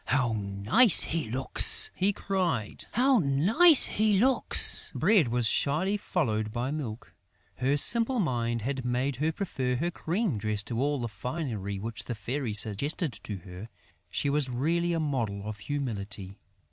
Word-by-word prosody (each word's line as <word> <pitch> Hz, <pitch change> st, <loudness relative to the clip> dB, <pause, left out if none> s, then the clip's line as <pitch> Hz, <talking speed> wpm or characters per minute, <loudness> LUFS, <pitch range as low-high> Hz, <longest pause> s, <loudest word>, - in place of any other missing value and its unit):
"How 125 Hz, -3 st, 0 dB
nice 105 Hz, -, +4 dB
he 160 Hz, -8 st, -3 dB
looks!" 130 Hz, +3 st, +1 dB
he 195 Hz, +2 st, +1 dB
cried. 180 Hz, -, -2 dB
"How 255 Hz, +1 st, +3 dB
nice 205 Hz, -, +6 dB
he 210 Hz, -1 st, +1 dB
looks!" 255 Hz, +3 st, +1 dB
Bread 205 Hz, -, +3 dB
was 120 Hz, 0 st, 0 dB
shyly 155 Hz, -, +1 dB
followed 110 Hz, -, -2 dB
by 120 Hz, +4 st, -3 dB
Milk. 125 Hz, -8 st, -6 dB, 0.4 s
Her 135 Hz, +3 st, +1 dB
simple 235 Hz, -, +3 dB
mind 120 Hz, -, -1 dB
had 135 Hz, +1 st, -3 dB
made 125 Hz, +2 st, -1 dB
her 155 Hz, +4 st, 0 dB
prefer 130 Hz, -8 st, -3 dB
her 170 Hz, +7 st, -2 dB
cream 170 Hz, -, -2 dB
dress 105 Hz, 0 st, -2 dB
to 115 Hz, +2 st, -3 dB
all 145 Hz, +1 st, 0 dB
the 120 Hz, -, -3 dB
finery 110 Hz, -, -5 dB
which 110 Hz, +3 st, -4 dB
the 120 Hz, -, -4 dB
Fairy 115 Hz, +2 st, -4 dB
suggested 130 Hz, -, 0 dB
to 105 Hz, -, -6 dB
her. 95 Hz, +4 st, -10 dB, 0.4 s
She -, -, -1 dB
was 140 Hz, -1 st, 0 dB
really 165 Hz, +8 st, 0 dB
a 165 Hz, -, -1 dB
model 120 Hz, -10 st, -2 dB
of 105 Hz, -1 st, -6 dB
humility. 105 Hz, -8 st, -5 dB
130 Hz, 155 wpm, -28 LUFS, 110-170 Hz, 0.4 s, nice